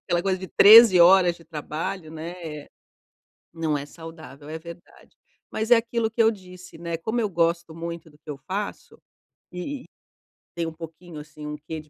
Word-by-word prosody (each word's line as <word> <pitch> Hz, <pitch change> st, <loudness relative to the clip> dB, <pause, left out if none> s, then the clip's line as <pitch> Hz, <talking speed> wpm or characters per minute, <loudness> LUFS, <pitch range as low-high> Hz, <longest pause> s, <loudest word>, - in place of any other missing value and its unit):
aquela 175 Hz, -1 st, +1 dB
coisa 190 Hz, 0 st, 0 dB
de 185 Hz, -1 st, -8 dB
13 215 Hz, -2 st, +8 dB
horas 175 Hz, 0 st, +6 dB
de 165 Hz, -, -18 dB
trabalho, 160 Hz, +3 st, -5 dB
né, 160 Hz, +2 st, -7 dB
é 150 Hz, -2 st, -8 dB, 0.8 s
Não 160 Hz, -3 st, -1 dB
é 140 Hz, -, -7 dB
saudável. 160 Hz, -3 st, -12 dB
É, 160 Hz, -, -5 dB
verdade. 170 Hz, +1 st, -14 dB, 0.3 s
Mas, 220 Hz, +2 st, -3 dB
é 240 Hz, -, +8 dB
aquilo 230 Hz, -1 st, -1 dB
que 230 Hz, +1 st, +2 dB
eu 225 Hz, -, +5 dB
disse, 180 Hz, -3 st, -13 dB
né, 170 Hz, -1 st, -4 dB
como 220 Hz, +8 st, -2 dB
eu 215 Hz, -, 0 dB
gosto 170 Hz, -1 st, 0 dB
muito 170 Hz, 0 st, -7 dB
do 150 Hz, -, -23 dB
que 155 Hz, -, -24 dB
eu 145 Hz, -, -7 dB
faço, 200 Hz, +2 st, -5 dB, 0.5 s
e 255 Hz, +10 st, -6 dB
e, -, -, -19 dB, 0.7 s
tem 170 Hz, -, -1 dB
um 165 Hz, -, -5 dB
pouquinho, 165 Hz, 0 st, -10 dB
assim, 150 Hz, 0 st, -11 dB
um 150 Hz, -, -5 dB
quê 155 Hz, +2 st, -7 dB
de 155 Hz, -, -15 dB
170 Hz, 190 wpm, -24 LUFS, 160-190 Hz, 0.8 s, 13